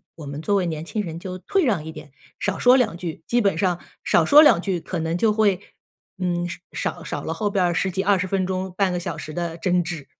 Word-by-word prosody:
我 155 - -9
们 140 +1 -6
作 200 +5 +1
为 185 - +1
年 160 -2 -3
轻 210 +6 -3
人 165 -5 -5
就 185 +1 -6
退 390 - 0
让 200 - 0
一 160 - -7
点， 145 - -11 0.3
少 205 -2 -2
说 250 +1 +6
两 230 -9 +1
句， 165 -2 -6
基 240 - +1
本 200 -7 +2
上 180 -1 +1 0.2
少 170 - +3
说 290 - +8
两 300 - +6
句， 180 -1 -2
可 175 - -4
能 165 +1 -1
就 220 +4 +3
会， 210 -3 +2 0.6
嗯， 175 -1 -1 0.3
少 - - -4
少 - - -4
了 - - -3
后 210 -2 -1
边 195 -2 +1
儿 175 -1 +2
10 190 +3 0
几 190 +1 -2
20 190 -2 +2
分 190 0 0
钟 185 0 -3
半 195 -1 +2
个 180 - -1
小 170 -2 -5
时 155 0 -7
的 170 0 -3
争 180 0 +1
执。 165 -4 -6
180 Hz, 260 characters per minute, -23 LUFS, 170-200 Hz, 0.6 s, 说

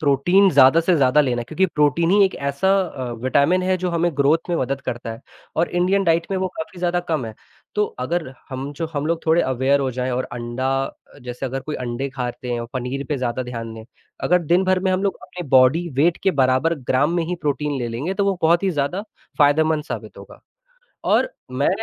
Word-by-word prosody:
protein 170 +8 +4
ज़्यादा 140 +2 +6
से 175 +2 +2
ज़्यादा 140 +1 +4
लेना 125 -4 0
क्योंकि 160 +10 0
प्रोटीन 160 +2 +1
ही 200 0 +6
एक 190 - 0
ऐसा 140 +6 -1
अ, 130 -8 -5
विटामिन 145 +8 +2
है 185 0 +1
जो 180 0 -2
हमें 170 0 +1
ग्रोथ 150 +5 +2
में 170 - +1
मदद 135 0 -2
करता 120 -3 -5
है 115 - -10 0.4
और 165 - +2
इंडियन 185 +3 +1
डाइट 165 -1 +2
में 195 - 0
वो 185 0 -1
काफ़ी 160 +3 -6
ज़्यादा 175 0 0
कम 155 -7 0
है, 110 - -8 0.4
तो 210 0 +2 0.2
अगर 160 +4 -2 0.2
हम 135 +2 -5
जो 165 +3 -4
हम 145 0 -2
लोग 165 0 -1
थोड़े 160 +2 +4
अवेयर 130 +2 +1
हो 135 -1 0
जाएँ 125 +1 -3
और 125 +1 -1
अंडा 120 +2 -3 0.5
जैसे 125 +2 -5
अगर 135 +1 -4
कोई 150 - -6
अंडे 125 +2 -3
खाते 125 -1 -4
हों, 115 - -4
पनीर 130 +2 -3
पे 150 - 0
ज़्यादा 125 -1 -2
ध्यान 115 -2 -6
दें, 110 0 -10 0.4
अगर 180 - +3
दिन 175 +4 +2
भर 185 0 +2
में 190 0 0
हम 185 +1 0
लोग 200 -1 0
अपनी 175 -3 -8
बॉडी 130 +7 +4
वेट 165 +5 +3
के 190 - +3
बराबर 135 +2 +2 0.2
ग्राम 145 +6 +2
में 170 - +1
ही 180 +2 -2
प्रोटीन 145 -1 -1
ले 120 -2 -2
लेंगे, 135 +11 -3
तो 200 0 0
वो 195 -2 0
बहुत 170 +3 +4
ही 190 - +1
ज़्यादा 150 +5 -1 0.4
फायदेमंद 150 +1 +3
साबित - - -7
होगा - - -13 0.6
और - - +3 0.2
मैं - - +1
145 Hz, 215 wpm, -21 LUFS, 130-175 Hz, 0.6 s, ज़्यादा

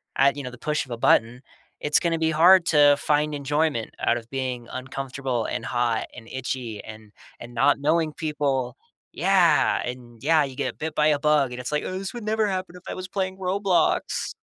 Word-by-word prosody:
at, 140 +1 +4
you 145 - -6
know, 125 - -6
the 125 - -13
push 150 -1 -1
of 130 - -14
a 120 - -3
button, 115 +1 +2 0.4
it's 150 0 +2
gonna 165 -1 0
be 160 0 +1
hard 170 +3 +6
to 145 -2 +6
find 150 +1 +1
enjoyment 145 -3 -1
out 120 - +1
of 115 -1 -10
being 130 -3 -4
uncomfortable 130 -2 -4
and 115 - -4
hot 120 -2 0
and 115 -2 -11
itchy 125 -4 -5
and 110 -1 -12 0.3
and 120 0 -10
not 140 +4 +3
knowing 155 +2 +1
people. 140 -5 -2 0.3
Yeah. 175 -4 +3
And, 120 -2 -8
yeah, 155 +1 +4
you 135 -2 -6
get 125 -1 -3
bit 160 0 -4
by 150 0 +2
a 150 -1 +3
bug, 150 -2 +2
and 125 - -6
it's 125 - -5
like, 150 - 0
"Oh, 185 - -4
this 195 0 -5
would 240 -2 -7
never 215 +1 +1
happen 185 -3 -3
if 180 - -13
I - - -4
was 185 0 -6
playing 190 -1 -3
Roblox." 185 -2 0
145 Hz, 205 wpm, -24 LUFS, 125-165 Hz, 0.4 s, hard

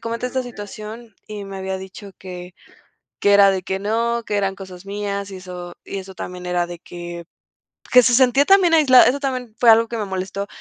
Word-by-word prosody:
comenté 230 +2 -3
esta 260 +1 -2
situación 220 0 -9
y 210 -1 -7
me 195 0 -8
había 190 0 -3
dicho 190 +2 -10
que 180 -1 -9 0.7
que 205 0 +4
era 200 -1 +7
de 190 -1 -2
que 190 +1 -3
no, 230 +3 0
que 205 - -1
eran 195 -1 -1
cosas 190 -1 -11
mías 200 0 -4
y 190 - -7
eso 180 -1 -9
y 195 - -5
eso 190 0 -9
también 180 0 -7
era 175 -1 0
de 175 -1 -8
que 175 0 -9 0.7
que 250 - +8
se 245 - +3
sentía 260 +3 +4
también 385 -4 +5
aislada. 270 -6 +7
Eso 270 +3 +1
también 255 -5 -4
fue 240 - +5
algo 225 +1 +6
que 235 - -4
me 210 - -2
molestó, 190 +1 -4
200 Hz, 210 wpm, -21 LUFS, 190-235 Hz, 0.7 s, que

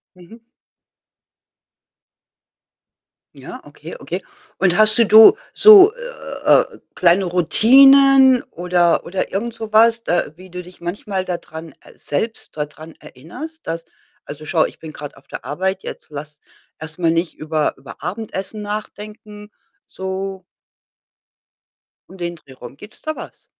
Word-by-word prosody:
Mhm. 185 +6 -16 2.9
Ja, - - -10
okay, - - -12
okay. - - -6 0.4
Und 180 -2 +1
hast 215 +1 +4
du 230 - +4
du 220 - +8 0.2
so, 420 -1 +8
äh, - - 0 0.3
kleine 180 +2 +3
Routinen 265 - +5
oder 175 0 +1
oder 185 +2 -4
irgend 225 +4 -3
so 220 -1 -8
was, 230 +1 +4
d - - -3
äh, 175 -4 0
wie 185 +2 -15
du 180 0 -7
dich 180 0 -16
manchmal 190 +2 -4
dadran 165 -4 -7
äh, - - -18
selbst 220 +4 -5
dadran 155 +2 -7
erinnerst, 285 - -11
dass 165 0 -5 0.4
„also, 150 +1 -10
schau, 160 0 +1
ich - - -9
bin 160 - -10
grad 145 -1 -10
auf 140 - -21
der - - -9
Arbeit 190 +5 -3
jetzt, - - -9
lass 150 0 -9 0.4
erst 160 +2 -8
mal 170 -2 +1
nicht 165 +1 -2
über 155 -1 -2
über - - -13
Abendessen 205 +2 -6
nachdenken“, 210 0 -8 0.4
so 190 0 -6 1.7
und 190 - -14
den 170 0 -4
Dreh 140 -5 -17
rum. 130 +1 -12
Gibt's 210 +6 -15
da 310 0 -4
was? - - -12
190 Hz, 135 wpm, -19 LUFS, 165-220 Hz, 2.9 s, du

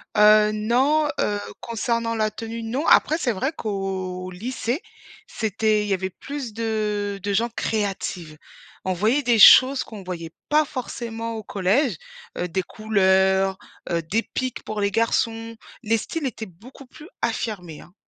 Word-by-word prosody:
Heu, 210 0 +6
non, 260 +8 +2
heu, 205 0 0 0.2
concernant 230 0 -1
la 215 -1 0
tenue, 230 +1 -6
non. 250 +8 -2
Après 315 - +5
c'est 255 -7 0
vrai 260 +9 -1
qu'au 190 -4 -4
lycée, 240 - -3 0.5
c'était 215 0 0
il - - -4
y - - +2
avait 190 0 -1
plus 265 +4 -7
de 210 -2 -2
de 200 +2 -2
gens 230 +4 +1
créatives. 195 -7 -3 0.5
On 185 - +1
voyait 220 +10 +2
des 240 -2 +3
choses 260 +6 +8
qu'on 210 -3 -10
voyait 170 -3 -6 0.2
pas 305 +1 +4
forcément 230 -4 -5
au 220 - -6
collège, 205 +9 +1 0.4
heu, 180 - -1
des 185 +2 -2
couleurs, 190 -2 +2 0.3
heu, 170 -1 0
des 205 +9 -1
pics 255 -2 -4
pour 215 - -5
les 200 0 +1
garçons, 230 +1 0 0.3
les 225 0 +2
styles 310 +7 -4
étaient 225 -3 -4
beaucoup 225 +10 -15
plus 300 +6 -14
affirmés, 180 -9 -3
hein. 180 - -17
215 Hz, 155 wpm, -23 LUFS, 195-235 Hz, 0.5 s, choses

